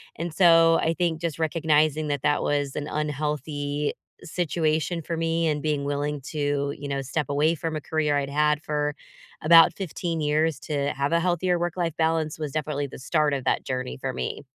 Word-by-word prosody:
And 170 0 -4
so, 165 -2 +6
I 165 - +1
think 170 -2 -1
just 165 -3 -2
recognizing 155 -1 +1
that 145 -2 -2
that 145 - +2
was 145 -2 -1
an 145 - -3
unhealthy 150 -1 -2 0.3
situation 165 -1 -1
for 165 - -3
me, 165 0 0
and 150 -1 0
being 150 -2 -1
willing 145 +1 -2
to, 145 0 -2
you 145 - -7
know, 140 -1 -2
step 140 +2 -2
away 150 +3 +2
from 165 0 -4
a 155 - -3
career 150 -1 0
I'd 140 -1 -2
had 150 +1 +2
for 150 -1 -1 0.5
about 165 +1 +7
15 170 -3 -3
years 155 0 +1
to 145 -3 -1
have 140 +3 -1
a 170 - +4
healthier 180 0 +1
work-life 175 -1 -2
balance, 160 -1 0
was 150 -2 -3
definitely 145 -1 -2
the - - -10
start 150 +2 +1
of 135 - -4
that - - +1
journey 130 -1 -4
for 130 0 -4
me. - - -4
150 Hz, 190 wpm, -25 LUFS, 145-165 Hz, 0.5 s, about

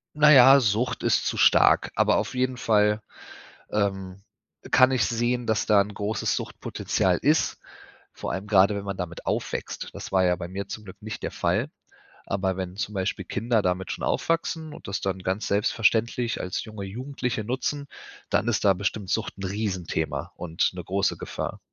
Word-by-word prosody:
Naja, 140 -3 +8
Sucht 115 +2 0
ist - - +2
zu - - -1
stark, - - +5
aber - - +3
auf - - -2
jeden 130 0 0
Fall, 105 -3 +2 0.7
ähm, 95 -2 -2 0.5
kann 130 0 +6
ich 125 -5 +2
sehen, 120 +2 0
dass 110 -3 +1
da 105 -2 +5
'n 105 +1 -8
großes 105 +2 -1
Suchtpotenzial - - -1
ist, - - +2 0.5
vor - - -5
allem 95 +3 -4
gerade, 100 0 +4
wenn 100 0 -4
man 100 -1 -4
damit 90 -2 -6
aufwächst. - - -3
Das - - -8
war 95 -1 +4
ja 90 0 +3
bei 85 -1 -6
mir 95 +2 -5
zum 105 +2 -7
Glück 95 0 -11
nicht 110 0 -6
der - - -2
Fall. - - 0 0.6
Aber 95 -1 -1
wenn 95 -1 -5
zum 105 0 -3
Beispiel 95 0 -2
Kinder 115 +3 0
damit 90 0 -1
schon - - -6
aufwachsen 165 -1 -1
und - - -11
das 100 +1 -3
dann 95 -1 -2
ganz 95 +3 -2
selbstverständlich 115 +2 +1
als 90 - -3
junge 110 -3 -7
Jugendliche 125 +1 -4
nutzen, 135 +4 -3 0.4
dann 110 - +1
ist 120 -3 +1
da 100 -2 +5
bestimmt 100 0 -3
Sucht 110 -3 -2
'n 95 - -6
Riesenthema 95 -5 -3
und 85 -1 -1
'ne 90 -1 -7
große 95 +2 0
Gefahr. - - -5
105 Hz, 175 wpm, -25 LUFS, 95-120 Hz, 0.7 s, Naja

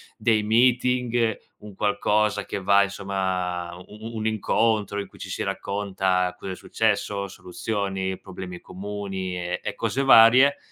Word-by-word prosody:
dei 110 -2 +2
meeting, 120 0 +2 0.2
un 105 -1 -11
qualcosa 105 +1 +1
che 100 - -4
va 100 +1 +5
insomma, 95 -3 -2
u 90 - -11
u 105 +1 -11
u - - -8
un 110 0 -1
incontro 110 -1 +1
in 100 - -5
cui - - -18
ci - - -8
si - - -4
racconta 95 -2 -1
cosa 95 - -6
è - - -4
successo, 100 -1 -1
soluzioni, 95 0 -3
problemi 90 -2 -8
comuni, 95 -1 -5
e 90 0 -3
e - - -3
cose 135 - -1
varie, 130 +2 +7
100 Hz, 150 wpm, -24 LUFS, 95-110 Hz, 0.2 s, varie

